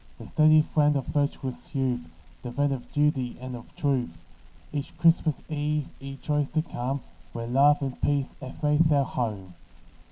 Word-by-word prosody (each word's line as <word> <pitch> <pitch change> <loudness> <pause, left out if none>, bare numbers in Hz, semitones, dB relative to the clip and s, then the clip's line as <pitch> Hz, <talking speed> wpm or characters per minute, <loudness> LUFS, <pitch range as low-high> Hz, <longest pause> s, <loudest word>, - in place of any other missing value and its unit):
The - - -10
steady 155 0 +5
friend 150 -1 +2
of 135 -3 -1
virtuous 140 -1 -2
youth, 130 -2 +1 0.4
The 125 -2 -6
friend 145 +2 +1
of 125 -2 -7
duty, 145 -4 +1
and 130 0 -6
of 120 - -11
truth, 140 - 0 0.6
Each 145 -1 -4
Christmas 165 -3 +3
eve 150 -1 -1
he 135 0 -7
joys 150 -2 0
to 155 - +3
come 135 -3 -3 0.3
Where 115 0 -4
love 140 +4 +4
and 135 -2 -4
peace 140 -2 +1
have 130 +4 -9
made 150 +2 +4
their 145 -3 +4
home. 105 -8 -3
140 Hz, 165 wpm, -27 LUFS, 130-150 Hz, 0.6 s, steady